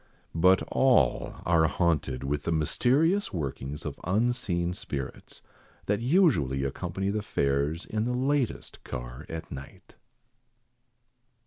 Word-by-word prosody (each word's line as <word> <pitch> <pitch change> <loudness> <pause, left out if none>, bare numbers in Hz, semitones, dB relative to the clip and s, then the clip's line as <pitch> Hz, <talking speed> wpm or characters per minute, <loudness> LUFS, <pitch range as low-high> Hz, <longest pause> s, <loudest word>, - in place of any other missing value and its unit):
But 90 +3 +4
all 125 - +3
are 80 -2 +4
haunted 75 -7 0
with 70 +1 -1
the 85 - -2
mysterious 140 - +2
workings 70 -2 -4
of - - -5
unseen 95 -3 0
spirits, 70 -6 -6 0.4
that 105 0 +1
usually 120 - +3
accompany 90 +8 -2
the 105 +1 -1
fares, 70 -2 0
in 110 +1 -2
the 125 - -1
latest 135 0 -1
car - - -7
at 80 0 -6
night. 70 +9 -10
85 Hz, 115 wpm, -28 LUFS, 70-115 Hz, 0.4 s, But